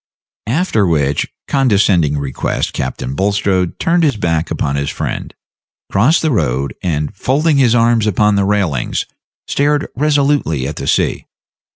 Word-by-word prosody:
After 120 Hz, -, +1 dB
which 75 Hz, -4 st, 0 dB, 0.2 s
condescending 100 Hz, -, +2 dB
request 70 Hz, -2 st, -2 dB
Captain 65 Hz, 0 st, -4 dB
Bulstrode 95 Hz, 0 st, 0 dB
turned 170 Hz, +1 st, +1 dB
his 145 Hz, -8 st, +2 dB
back 80 Hz, -5 st, -1 dB
upon 70 Hz, -, -2 dB
his 70 Hz, 0 st, -1 dB
friend, -, -, -4 dB, 0.6 s
crossed 130 Hz, +14 st, +3 dB
the 160 Hz, -, +1 dB
road, 70 Hz, -, 0 dB
and, 75 Hz, -3 st, -2 dB
folding 145 Hz, +8 st, +1 dB
his 125 Hz, -4 st, +4 dB
arms 115 Hz, -2 st, +3 dB
upon 105 Hz, +1 st, +2 dB
the 100 Hz, -, +2 dB
railings, 95 Hz, -11 st, -1 dB, 0.4 s
stared 145 Hz, +1 st, +1 dB
resolutely 140 Hz, -, +1 dB
at 75 Hz, -, -6 dB
the -, -, -5 dB
sea. -, -, 0 dB
100 Hz, 140 wpm, -16 LUFS, -, 0.6 s, his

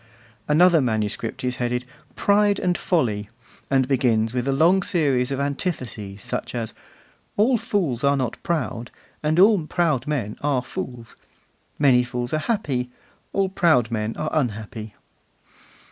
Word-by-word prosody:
Another 165 Hz, +2 st, +5 dB
manuscript 110 Hz, -1 st, -2 dB
is 125 Hz, -1 st, -1 dB
headed 125 Hz, 0 st, -1 dB, 0.3 s
'Pride 205 Hz, 0 st, +3 dB
and 180 Hz, -1 st, 0 dB
Folly,' 110 Hz, -, 0 dB, 0.4 s
and 135 Hz, -2 st, +2 dB
begins 120 Hz, -4 st, +2 dB
with 125 Hz, +1 st, -1 dB
a -, -, +2 dB
long 170 Hz, +8 st, +4 dB
series 140 Hz, -9 st, +1 dB
of 135 Hz, -1 st, -2 dB
antitheses, 130 Hz, -, -3 dB
such -, -, -4 dB
as: 115 Hz, -2 st, -3 dB, 0.6 s
'All 230 Hz, +5 st, +4 dB
fools 170 Hz, -, -1 dB
are 140 Hz, 0 st, +3 dB
not 125 Hz, -4 st, -3 dB
proud, 135 Hz, -8 st, -2 dB, 0.3 s
and 155 Hz, +2 st, +1 dB
all 195 Hz, -5 st, +5 dB
proud 155 Hz, -8 st, 0 dB
men 120 Hz, -9 st, -2 dB
are 140 Hz, -3 st, +1 dB
fools. 120 Hz, -2 st, -7 dB, 0.6 s
Many 130 Hz, -4 st, +5 dB
fools 125 Hz, +1 st, -4 dB
are 155 Hz, -, +2 dB
happy, 145 Hz, -, -1 dB, 0.4 s
all 195 Hz, -1 st, +1 dB
proud 160 Hz, -, +3 dB
men 110 Hz, 0 st, -2 dB
are 155 Hz, -, -2 dB
unhappy. 110 Hz, -5 st, -3 dB
130 Hz, 140 wpm, -23 LUFS, 120-165 Hz, 0.6 s, Another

